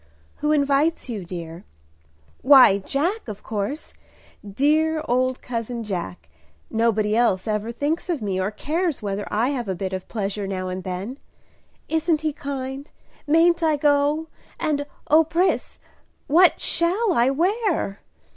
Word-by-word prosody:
"Who 300 Hz, -, 0 dB
invites 285 Hz, +1 st, +1 dB
you, 215 Hz, -5 st, -4 dB
dear?" 170 Hz, 0 st, -8 dB, 0.8 s
"Why, 260 Hz, -8 st, +7 dB
Jack, 315 Hz, -, -2 dB
of 210 Hz, -2 st, -7 dB
course, 215 Hz, +8 st, -4 dB, 0.5 s
dear 305 Hz, +9 st, +1 dB
old 255 Hz, +1 st, 0 dB
cousin 235 Hz, -1 st, -4 dB
Jack. 180 Hz, -4 st, -5 dB, 0.4 s
Nobody 220 Hz, -2 st, +1 dB
else 225 Hz, -4 st, +2 dB
ever 215 Hz, +1 st, -1 dB
thinks 295 Hz, +9 st, -2 dB
of 335 Hz, -5 st, 0 dB
me, 195 Hz, -4 st, -2 dB
or 190 Hz, -, 0 dB
cares 315 Hz, -, -2 dB
whether 200 Hz, 0 st, -3 dB
I 225 Hz, +5 st, +1 dB
have 250 Hz, -6 st, -3 dB
a 190 Hz, -, -2 dB
bit 190 Hz, +1 st, -4 dB
of 185 Hz, -1 st, -5 dB
pleasure 200 Hz, -2 st, -3 dB
now 185 Hz, -1 st, -3 dB
and 185 Hz, 0 st, -5 dB
then. 190 Hz, +9 st, -5 dB, 0.7 s
Isn't 320 Hz, 0 st, +1 dB
he 310 Hz, -1 st, -1 dB
kind? 275 Hz, 0 st, -5 dB, 0.4 s
Mayn't 335 Hz, +3 st, +4 dB
I 315 Hz, -2 st, +3 dB
go? 290 Hz, +2 st, +2 dB, 0.3 s
and, 290 Hz, -2 st, -1 dB, 0.2 s
O 315 Hz, +2 st, +6 dB
Pris, 345 Hz, +4 st, 0 dB, 0.5 s
what 345 Hz, +5 st, +5 dB
shall 370 Hz, +5 st, +1 dB
I 240 Hz, -1 st, +3 dB
wear?" 345 Hz, -, 0 dB
265 Hz, 140 wpm, -23 LUFS, 205-310 Hz, 0.8 s, Why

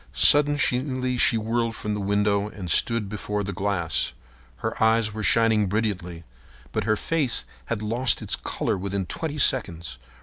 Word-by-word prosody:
Suddenly 130 Hz, -3 st, +3 dB
she 120 Hz, -, +4 dB
whirled 115 Hz, +1 st, -1 dB
from 105 Hz, -1 st, -3 dB
the 105 Hz, -, -3 dB
window 100 Hz, +1 st, +1 dB
and 90 Hz, -5 st, -6 dB
stood 115 Hz, +1 st, +2 dB
before 105 Hz, 0 st, -3 dB
the 100 Hz, 0 st, -4 dB
glass. 95 Hz, -4 st, -1 dB, 0.4 s
Her 110 Hz, -, -5 dB
eyes 110 Hz, -1 st, +3 dB
were 110 Hz, -, -5 dB
shining 110 Hz, -1 st, +3 dB
brilliantly, 90 Hz, -5 st, -2 dB, 0.5 s
but 110 Hz, -, -2 dB
her 110 Hz, 0 st, +2 dB
face 145 Hz, +2 st, -1 dB, 0.2 s
had 110 Hz, -2 st, -3 dB
lost 115 Hz, +3 st, +2 dB
its -, -, -2 dB
color -, -, -2 dB
within 100 Hz, 0 st, -3 dB
twenty 155 Hz, -, -4 dB
seconds. 85 Hz, -, 0 dB
105 Hz, 155 wpm, -25 LUFS, 100-115 Hz, 0.5 s, she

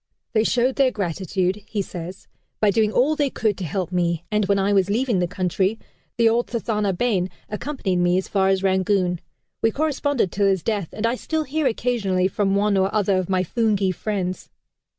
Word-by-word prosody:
"They 220 Hz, -1 st, +3 dB
showed 245 Hz, +3 st, +1 dB
their 270 Hz, -2 st, +4 dB
gratitude," 190 Hz, -1 st, -2 dB
he 205 Hz, -3 st, -2 dB
says, 180 Hz, +1 st, -8 dB, 0.3 s
"by 210 Hz, -2 st, +4 dB
doing 215 Hz, 0 st, +2 dB
all 275 Hz, +7 st, +2 dB
they 290 Hz, -2 st, +1 dB
could 215 Hz, -5 st, 0 dB
to -, -, -4 dB
help 180 Hz, +2 st, -3 dB
me, 170 Hz, -2 st, 0 dB
and 210 Hz, -2 st, +1 dB
when 200 Hz, -, +3 dB
I 195 Hz, +1 st, +2 dB
was 195 Hz, -1 st, +3 dB
leaving 230 Hz, -1 st, +1 dB
the 175 Hz, -, +1 dB
country, 190 Hz, +3 st, 0 dB, 0.4 s
the 230 Hz, -1 st, +4 dB
old 235 Hz, +2 st, +2 dB
Thathana 215 Hz, -4 st, -1 dB
bain 195 Hz, -6 st, +1 dB, 0.2 s
accompanied 210 Hz, -4 st, -2 dB
me 175 Hz, 0 st, +3 dB
as 190 Hz, -, -2 dB
far 190 Hz, -2 st, +1 dB
as 195 Hz, 0 st, +1 dB
Rangoon. 190 Hz, -2 st, +1 dB, 0.4 s
We 225 Hz, -, +4 dB
corresponded 285 Hz, -, 0 dB
till 200 Hz, 0 st, +1 dB
his 190 Hz, -3 st, +1 dB
death, 205 Hz, -7 st, -1 dB
and 215 Hz, -, -3 dB
I 230 Hz, -, +2 dB
still 315 Hz, +5 st, -2 dB
hear 300 Hz, 0 st, 0 dB
occasionally 215 Hz, -6 st, 0 dB
from 195 Hz, 0 st, 0 dB
one 200 Hz, 0 st, +2 dB
or 190 Hz, +1 st, +2 dB
other 200 Hz, -3 st, +2 dB
of 185 Hz, -, -4 dB
my 185 Hz, -1 st, +2 dB
Phoonghi 205 Hz, -1 st, +1 dB
friends." 185 Hz, -1 st, -3 dB
200 Hz, 195 wpm, -23 LUFS, 185-230 Hz, 0.4 s, their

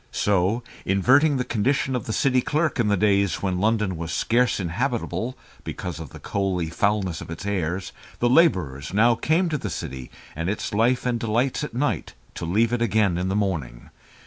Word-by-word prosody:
So, 100 Hz, +4 st, +1 dB, 0.2 s
inverting 135 Hz, +10 st, +4 dB
the 125 Hz, -, 0 dB
condition 130 Hz, +4 st, 0 dB
of 120 Hz, -, -3 dB
the -, -, -2 dB
city 130 Hz, +2 st, +2 dB
clerk 155 Hz, +1 st, 0 dB
in 115 Hz, -, +2 dB
the 105 Hz, -1 st, +2 dB
days 100 Hz, -1 st, +2 dB
when 90 Hz, -2 st, 0 dB
London 105 Hz, -2 st, +1 dB
was 80 Hz, 0 st, -5 dB
scarce 120 Hz, +8 st, +1 dB
inhabitable 120 Hz, +6 st, -2 dB, 0.3 s
because 85 Hz, -4 st, -5 dB
of 80 Hz, -4 st, -7 dB
the -, -, -11 dB
coaly 95 Hz, -5 st, -2 dB
foulness 100 Hz, -3 st, 0 dB
of -, -, -9 dB
its 80 Hz, +4 st, -7 dB
air, 90 Hz, -3 st, -1 dB, 0.4 s
the 120 Hz, -, +1 dB
labourers 95 Hz, -, +2 dB
now 115 Hz, +3 st, +5 dB
came 160 Hz, +10 st, +1 dB
to 150 Hz, -2 st, -1 dB
the -, -, -4 dB
city 65 Hz, -1 st, -6 dB, 0.3 s
and 80 Hz, +4 st, -2 dB
its 105 Hz, -, -3 dB
life 120 Hz, +4 st, +2 dB
and 120 Hz, -2 st, 0 dB
delights 120 Hz, +5 st, 0 dB
at 150 Hz, -, -6 dB
night 145 Hz, -, -1 dB, 0.2 s
to -, -, -5 dB
leave 110 Hz, +7 st, +2 dB
it 120 Hz, -, 0 dB
again 105 Hz, -5 st, +2 dB
in 90 Hz, -, -1 dB
the 95 Hz, -, -1 dB
morning. 80 Hz, -13 st, -3 dB
105 Hz, 190 wpm, -24 LUFS, 90-125 Hz, 0.4 s, now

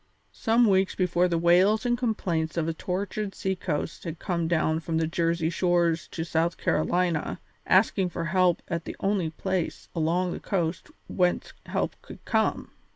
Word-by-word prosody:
Some 230 Hz, +2 st, +3 dB
weeks 195 Hz, -1 st, +2 dB
before 180 Hz, -1 st, +2 dB
the 170 Hz, -1 st, 0 dB
wails 185 Hz, +7 st, +4 dB
and 240 Hz, 0 st, +2 dB
complaints 180 Hz, -10 st, -1 dB
of 165 Hz, -1 st, 0 dB
a 165 Hz, -, 0 dB
tortured 195 Hz, +4 st, -3 dB
sea 190 Hz, 0 st, -1 dB
coast 160 Hz, -4 st, -3 dB
had 165 Hz, -2 st, -5 dB
come 170 Hz, -3 st, -1 dB
down 160 Hz, -1 st, +1 dB
from 165 Hz, 0 st, -2 dB
the 160 Hz, -, +2 dB
Jersey 165 Hz, 0 st, 0 dB
shores 170 Hz, -2 st, +1 dB
to 160 Hz, -, -4 dB
South 165 Hz, +1 st, 0 dB
Carolina, 170 Hz, 0 st, 0 dB, 0.3 s
asking 190 Hz, -1 st, +3 dB
for 170 Hz, -1 st, -4 dB
help 180 Hz, +1 st, +2 dB
at 170 Hz, -2 st, -3 dB
the -, -, -6 dB
only 195 Hz, -4 st, 0 dB
place 185 Hz, +1 st, -3 dB
along 175 Hz, +2 st, +1 dB
that -, -, -5 dB
coast 170 Hz, -, -2 dB, 0.2 s
whence 180 Hz, -1 st, 0 dB
help -, -, -1 dB
could -, -, -13 dB
come. -, -, 0 dB
175 Hz, 165 wpm, -27 LUFS, 165-190 Hz, 0.3 s, wails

